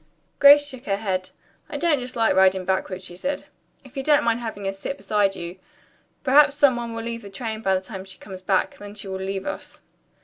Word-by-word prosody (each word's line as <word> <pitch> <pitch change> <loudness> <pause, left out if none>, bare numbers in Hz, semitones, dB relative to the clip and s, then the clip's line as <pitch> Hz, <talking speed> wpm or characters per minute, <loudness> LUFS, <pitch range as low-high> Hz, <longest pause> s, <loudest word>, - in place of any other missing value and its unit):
Grace 290 +1 +8
shook 260 -3 -9
her 195 -1 +1
head. 190 -3 -2 0.4
"I - - -4
don't 330 -5 +2
dislike 245 -2 +1
riding 190 -1 +4
backward," 190 0 -1
she 175 -1 -9
said, 275 +11 -3 0.4
"if 265 - -17
you 270 - -2
don't 295 +1 +4
mind 230 0 +1
having 220 -4 -6
her 195 - -1
sit 195 +8 -5
beside 205 -6 +1
you. 175 +1 -7 0.6
Perhaps 285 +1 +5
some 285 -4 +4
one 235 -1 -4
will 230 - -4
leave 230 0 -4
the 200 - -10
train 220 +2 -5
by 190 -3 +2
the 185 - -1
time 190 0 -7
she 190 0 -9
comes 190 -2 -10
back; 190 0 0
then 205 0 -9
she 200 -1 -5
will 190 0 -4
leave 190 0 -3
us." 295 - -7
210 Hz, 225 wpm, -24 LUFS, 190-255 Hz, 0.6 s, Grace